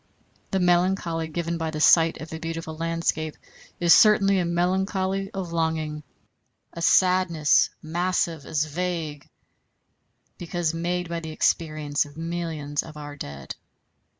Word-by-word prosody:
The 190 Hz, -, 0 dB
melancholy 175 Hz, -2 st, +1 dB
given 170 Hz, +1 st, -3 dB
by 160 Hz, -1 st, -2 dB
the 155 Hz, -1 st, -5 dB
sight 165 Hz, +1 st, +5 dB
of 160 Hz, +1 st, -8 dB
a 160 Hz, -, -5 dB
beautiful 165 Hz, -1 st, -5 dB
landscape 165 Hz, -1 st, -2 dB, 0.4 s
is 170 Hz, -1 st, +6 dB
certainly 200 Hz, -3 st, +5 dB
a 180 Hz, -, 0 dB
melancholy 190 Hz, +2 st, 0 dB
of 190 Hz, -4 st, -5 dB
longing, 160 Hz, -2 st, -1 dB, 0.7 s
a 170 Hz, -, -7 dB
sadness 180 Hz, -4 st, +4 dB
massive 170 Hz, -1 st, -1 dB
as 150 Hz, +2 st, 0 dB
vague, 160 Hz, -2 st, -4 dB, 1.1 s
because 175 Hz, -1 st, -2 dB
made 175 Hz, +1 st, -2 dB
by 170 Hz, 0 st, -3 dB
the 160 Hz, -1 st, -7 dB
experience 155 Hz, -2 st, 0 dB
of 145 Hz, +1 st, -14 dB
millions 165 Hz, -3 st, -3 dB
of 155 Hz, -2 st, -11 dB
our 145 Hz, -1 st, -8 dB
dead. 70 Hz, -, -7 dB
165 Hz, 130 wpm, -25 LUFS, 155-180 Hz, 1.1 s, is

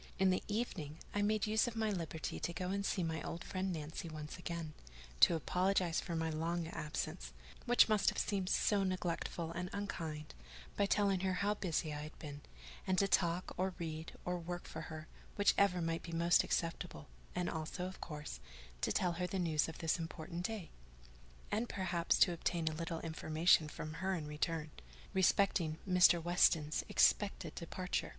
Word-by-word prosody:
In 190 Hz, 0 st, +4 dB
the 185 Hz, -, +1 dB
evening, 190 Hz, -9 st, -3 dB, 0.2 s
I 205 Hz, -, +1 dB
made 210 Hz, 0 st, +2 dB
use 220 Hz, +2 st, +3 dB
of 235 Hz, -, -4 dB
my 220 Hz, -1 st, +1 dB
liberty 165 Hz, -4 st, -3 dB
to 170 Hz, -, -2 dB
go 180 Hz, +1 st, -2 dB
and 200 Hz, 0 st, -1 dB
see 190 Hz, -2 st, 0 dB
my 160 Hz, -1 st, -2 dB
old 165 Hz, -, -5 dB
friend 190 Hz, 0 st, -2 dB
Nancy 160 Hz, 0 st, -5 dB
once 150 Hz, -1 st, -6 dB
again; 170 Hz, -3 st, -4 dB, 0.5 s
to 65 Hz, -, +7 dB
apologize 180 Hz, +1 st, +1 dB
for 170 Hz, -, -4 dB
my 160 Hz, 0 st, 0 dB
long 165 Hz, +2 st, -1 dB
absence 150 Hz, -, -4 dB, 0.3 s
(which 245 Hz, 0 st, +7 dB
must 215 Hz, -2 st, +4 dB
have -, -, -5 dB
seemed 195 Hz, -3 st, 0 dB
so 205 Hz, -1 st, +3 dB
neglectful 175 Hz, -2 st, -2 dB
and 175 Hz, +2 st, -3 dB
unkind) 160 Hz, -7 st, -4 dB, 0.4 s
by 200 Hz, -, +2 dB
telling 200 Hz, -2 st, +3 dB
her 190 Hz, 0 st, 0 dB
how 200 Hz, +3 st, +1 dB
busy 165 Hz, -6 st, -1 dB
I 150 Hz, -, -4 dB
had 155 Hz, +1 st, -8 dB
been; 145 Hz, -2 st, -8 dB, 0.5 s
and 185 Hz, 0 st, +2 dB
to 195 Hz, -, +4 dB
talk, 175 Hz, -1 st, +1 dB
or 185 Hz, 0 st, 0 dB
read, 160 Hz, -1 st, -5 dB
or 180 Hz, 0 st, -1 dB
work 175 Hz, +1 st, -5 dB
for 160 Hz, -, -6 dB
her, 155 Hz, -1 st, -7 dB, 0.3 s
whichever 200 Hz, -3 st, +4 dB
might 165 Hz, 0 st, -1 dB
be 170 Hz, -, -8 dB
most 170 Hz, +1 st, +4 dB
acceptable, 165 Hz, -, -2 dB, 0.3 s
and 180 Hz, 0 st, 0 dB
also, 160 Hz, +3 st, -3 dB
of 185 Hz, +1 st, -7 dB
course, 150 Hz, -, -6 dB, 0.4 s
to -, -, +1 dB
tell 180 Hz, -, +2 dB
her 180 Hz, +1 st, -2 dB
the 190 Hz, -, -3 dB
news 165 Hz, -4 st, +1 dB
of 160 Hz, -, -8 dB
this 165 Hz, +1 st, 0 dB
important 170 Hz, +1 st, -4 dB
day: 215 Hz, -6 st, -6 dB, 0.8 s
and 225 Hz, +3 st, 0 dB
perhaps 175 Hz, -3 st, +1 dB
to 175 Hz, -, +6 dB
obtain 170 Hz, -1 st, -1 dB
a 160 Hz, -, +2 dB
little 165 Hz, +1 st, -3 dB
information 160 Hz, 0 st, +3 dB
from 155 Hz, 0 st, -6 dB
her 190 Hz, 0 st, +1 dB
in 160 Hz, -4 st, -4 dB
return, 150 Hz, +1 st, -2 dB, 0.4 s
respecting 185 Hz, -4 st, +3 dB
Mr. 180 Hz, -2 st, +6 dB
Weston's 165 Hz, -3 st, +3 dB
expected 205 Hz, -1 st, +3 dB
departure. 180 Hz, +1 st, -3 dB
170 Hz, 180 wpm, -36 LUFS, 160-190 Hz, 0.8 s, to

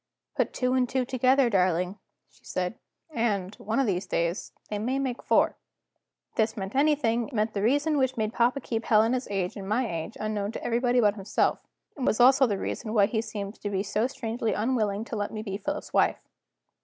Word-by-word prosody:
"Put -, -, +1 dB
two 250 Hz, 0 st, 0 dB
and 255 Hz, -2 st, +2 dB
two 260 Hz, -2 st, 0 dB
together, 255 Hz, +1 st, +3 dB
darling," 185 Hz, -2 st, +1 dB, 0.3 s
she -, -, -28 dB
said; 185 Hz, +5 st, -3 dB, 0.3 s
"and, 210 Hz, -7 st, -1 dB
one 220 Hz, +5 st, -2 dB
of 270 Hz, -, +3 dB
these 190 Hz, -3 st, -1 dB
days, 170 Hz, +1 st, -1 dB, 0.2 s
they 210 Hz, -, -3 dB
may 250 Hz, +5 st, -1 dB
make 260 Hz, -3 st, -2 dB
four." -, -, +2 dB, 0.7 s
If -, -, -30 dB
this 220 Hz, 0 st, +1 dB
meant 195 Hz, 0 st, -4 dB
anything, 270 Hz, -5 st, +2 dB
it 280 Hz, -, -10 dB
meant 215 Hz, +1 st, 0 dB
that 200 Hz, -, -2 dB
the -, -, -2 dB
reason 290 Hz, +5 st, +2 dB
which 260 Hz, -1 st, +1 dB
made 215 Hz, 0 st, -1 dB
papa 245 Hz, +4 st, +2 dB
keep 225 Hz, -2 st, -3 dB
Helena's 230 Hz, +4 st, +3 dB
age 190 Hz, -3 st, -2 dB
and 195 Hz, -1 st, -7 dB
my 235 Hz, +3 st, +1 dB
age 165 Hz, +2 st, -5 dB
unknown 215 Hz, -1 st, -2 dB
to -, -, -6 dB
everybody 245 Hz, +1 st, +2 dB
but 205 Hz, -2 st, +4 dB
himself, 200 Hz, -1 st, 0 dB, 0.4 s
was 250 Hz, -5 st, 0 dB
also 265 Hz, +2 st, +6 dB
the 205 Hz, -3 st, -1 dB
reason 215 Hz, +2 st, -4 dB
why 205 Hz, -2 st, +6 dB
he 220 Hz, +2 st, -1 dB
seemed 205 Hz, -2 st, -6 dB
to 205 Hz, -, -2 dB
be 195 Hz, -1 st, -1 dB
so 215 Hz, +3 st, 0 dB
strangely 230 Hz, -3 st, -2 dB
unwilling 215 Hz, -2 st, 0 dB
to 235 Hz, -, -5 dB
let 205 Hz, -1 st, -2 dB
me 215 Hz, -1 st, -5 dB
be 195 Hz, -3 st, -4 dB
Philip's 200 Hz, -, -4 dB
wife. -, -, +3 dB
220 Hz, 205 wpm, -27 LUFS, 205-250 Hz, 0.7 s, also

